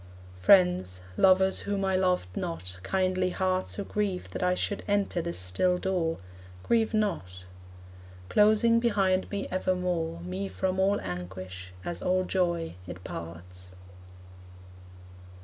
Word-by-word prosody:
Friends, 95 - +4
lovers 190 - +4
whom 200 -1 -2
I 190 -1 +1
loved 180 - +1
not, 90 +2 -4
kindly 185 - 0
hearts 185 0 -1
Who 200 - -3
grieve 200 -3 -2
that - - -5
I 180 0 +2
should 205 +2 -2
enter 200 -3 +1
this 170 +1 -3
still 95 - +1
door, 180 -3 -1 0.5
Grieve 225 -2 +2
not. 95 - -2 0.8
Closing 215 - +4
behind 195 -5 +1
me 200 -1 -3
evermore, 180 -3 -1
Me 185 +3 -4
from 190 -1 -2
all 195 +2 +3
anguish, 95 +1 -7
as 175 - -3
all 185 0 +2
joy, 170 -3 0
it 90 0 -8
parts. 90 +2 -8
180 Hz, 125 wpm, -28 LUFS, -, 0.8 s, Friends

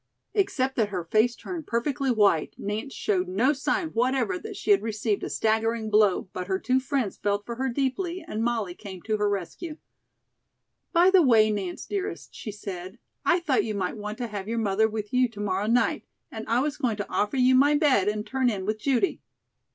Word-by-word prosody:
Except 270 -10 0
that 220 -3 +2
her 185 -4 -3
face 220 +7 +2
turned 335 +2 -7
perfectly 265 +3 -1
white, 205 -9 +3
Nance 215 +7 -4
showed 190 -7 0
no 225 +10 +2
sign 310 +4 -1
whatever 260 +9 0
that 425 +1 -8
she 415 +1 0
had 400 - +5
received 215 -1 -1
a - - -3
staggering 220 +7 0
blow, 210 -3 +3
but 180 0 -4
her 190 -1 +1
two 255 +6 +1
friends 260 -5 -2
felt 205 0 -1
for 235 -1 -6
her 265 +1 0
deeply 320 +8 -2
and 220 -7 -2
Molly 225 -6 -1
came 190 -2 -10
to 215 -1 0
her 210 0 +1
rescue. 205 - -4 1.1
"By 350 +2 +5
the 380 -2 +7
way, 225 -7 +5
Nance, 195 -4 -4
dearest," 405 0 -4
she 215 - -6
said, 190 -1 -7 0.3
"I 360 -1 +3
thought 285 -7 +2
you 215 -2 -3
might 185 0 -2
want 210 0 -6
to 245 - -3
have 205 -3 -6
your 230 +1 -2
mother 220 0 +2
with 210 0 -5
you 250 -1 +3
to 215 -2 -12
morrow 200 0 -1
night, 240 +2 +2 0.3
and 220 0 -7
I 235 +2 +2
was 295 +1 -2
going 245 -7 0
to 205 - -4
offer 210 +6 0
you 255 0 +5
my 285 +3 +5
bed 280 - +3
and 210 0 -1
turn 260 +2 +1
in 195 -4 -3
with 215 +1 -1
Judy." 275 - +1
225 Hz, 205 wpm, -26 LUFS, 205-270 Hz, 1.1 s, the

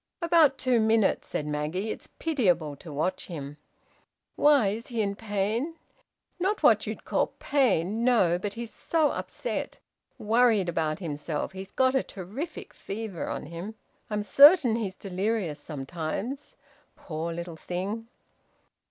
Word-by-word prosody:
"About 330 -5 +4
two 250 -2 +2
minutes," 220 -1 +2
said 150 - -3
Maggie. 150 +8 -2
"It's - - -8
pitiable 180 - +1
to 160 - -10
watch 155 +6 -2
him." 145 -4 -7 0.8
"Why? 285 -8 +5
Is 220 +3 -5
he 235 -2 -4
in 200 0 -2
pain?" 220 +8 -2 0.6
"Not 390 +4 0
what - - +5
you'd - - -5
call - - 0
pain. 225 - +1
No! 190 -9 +4
But 205 +2 -4
he's 235 -1 -6
so 315 -3 +1
upset. - - -4 0.4
Worried 220 -3 +3
about 160 -2 0
himself. 150 -3 -4
He's 190 0 -8
got 260 0 +3
a 265 - +3
terrific 210 - -7
fever 205 -4 -5
on - - -4
him. 170 +7 -7 0.3
I'm 210 -1 -1
certain 275 - +7
he's 205 -5 -3
delirious 195 -4 -2
sometimes. 170 - -5 0.4
Poor 165 0 -5
little 170 0 -6
thing!" 195 +7 -4
205 Hz, 135 wpm, -27 LUFS, 170-240 Hz, 0.8 s, certain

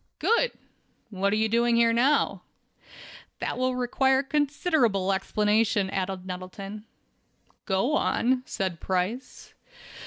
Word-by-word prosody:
"Good! 470 +2 +2 0.6
What 200 0 0
are - - +2
you 220 +1 +2
doing 235 +1 +2
here 230 0 +4
now?" 260 +6 +2 1.0
"That - - -4
will 255 0 0
require 265 +2 +2
considerable 275 - +1
explanation," 210 +1 +1
added 190 -1 -3
Nettleton. 195 +3 -7 0.8
"Go 195 +9 +1
on," 255 -3 +1
said 185 -4 -3
Price. 190 +8 -3
220 Hz, 105 wpm, -26 LUFS, 195-255 Hz, 1.0 s, here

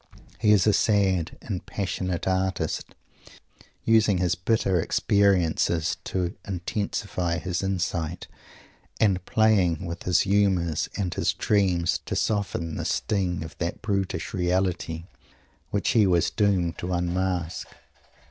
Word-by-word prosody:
He 105 - +4
is 105 -3 +5
a 105 - +4
sad 95 -6 +2
and 95 -5 -4
passionate 90 -3 -3
artist, 95 -4 -1 0.9
using 110 -3 +4
his 90 -1 +1
bitter 95 0 +1
experiences 90 -5 +2
to 90 -2 -2
intensify 90 -2 -2
his 90 -2 -2
insight, 85 -3 -2 0.7
and 95 -4 +2
playing 95 -6 +3
with 85 0 -5
his 90 -2 +3
humours 95 -5 +1
and 95 -4 -1
his - - 0
dreams 90 -5 +1
to - - -2
soften 95 -6 -1
the - - -3
sting 90 -5 -1
of 80 -1 -9
that 85 0 -3
brutish 100 -4 -2
reality 90 -3 -1 0.7
which 100 - 0
he 110 -4 +4
was 85 -2 +2
doomed 95 -5 +1
to 90 +1 -3
unmask. 90 -1 -1
90 Hz, 120 wpm, -26 LUFS, 85-100 Hz, 0.9 s, is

